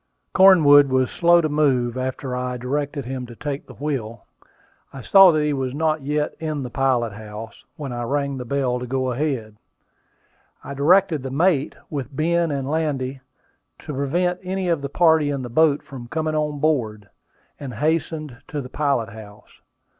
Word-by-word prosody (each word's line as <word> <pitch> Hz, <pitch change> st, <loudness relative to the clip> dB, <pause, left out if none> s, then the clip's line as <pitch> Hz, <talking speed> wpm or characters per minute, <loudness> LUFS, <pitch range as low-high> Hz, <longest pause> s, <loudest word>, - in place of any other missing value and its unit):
Cornwood 150 Hz, -7 st, +7 dB
was 130 Hz, -1 st, +1 dB
slow 170 Hz, 0 st, +4 dB
to 155 Hz, -, 0 dB
move, 135 Hz, -5 st, +1 dB
after 130 Hz, 0 st, -3 dB
I 125 Hz, 0 st, -3 dB
directed 140 Hz, +2 st, -3 dB
him 130 Hz, -1 st, -5 dB
to 120 Hz, -, -11 dB
take 145 Hz, +2 st, -5 dB
the -, -, -12 dB
wheel. 130 Hz, -6 st, -4 dB, 0.7 s
I 135 Hz, -, -9 dB
saw 195 Hz, -, +7 dB
that 155 Hz, -2 st, +1 dB
he 150 Hz, 0 st, 0 dB
was 130 Hz, -1 st, -3 dB
not 155 Hz, 0 st, 0 dB
yet 150 Hz, +2 st, -1 dB
in 155 Hz, -3 st, -3 dB
the 125 Hz, -, -7 dB
pilot 125 Hz, -4 st, 0 dB
house, 110 Hz, +2 st, -10 dB
when 140 Hz, -4 st, -6 dB
I 120 Hz, -, -4 dB
rang 140 Hz, +3 st, -1 dB
the 125 Hz, -, -5 dB
bell 125 Hz, -1 st, -1 dB
to 125 Hz, -, -6 dB
go 130 Hz, 0 st, -1 dB
ahead. 125 Hz, -6 st, -3 dB, 1.1 s
I 140 Hz, -, -7 dB
directed 160 Hz, +2 st, +3 dB
the 130 Hz, -, -5 dB
mate 150 Hz, +1 st, +1 dB, 0.2 s
with 140 Hz, -2 st, -5 dB
Ben 170 Hz, +3 st, +1 dB
and 140 Hz, -2 st, -3 dB
Landy 140 Hz, -4 st, -2 dB, 0.6 s
to 150 Hz, -, -5 dB
prevent 175 Hz, +7 st, 0 dB
any 185 Hz, 0 st, -3 dB
of 165 Hz, -4 st, +1 dB
the 140 Hz, -, -4 dB
party 160 Hz, -2 st, +3 dB
in 140 Hz, -2 st, -3 dB
the 120 Hz, -, -6 dB
boat 150 Hz, +3 st, +3 dB
from 125 Hz, -3 st, -10 dB
coming 155 Hz, +3 st, -2 dB
on 150 Hz, -1 st, -1 dB
board, 115 Hz, -9 st, -1 dB, 0.5 s
and 130 Hz, -5 st, -7 dB
hastened 155 Hz, -1 st, -2 dB
to 150 Hz, -, -4 dB
the 130 Hz, -2 st, -7 dB
pilot 140 Hz, -6 st, 0 dB
house. 105 Hz, -1 st, -14 dB
140 Hz, 175 wpm, -22 LUFS, 125-155 Hz, 1.1 s, Cornwood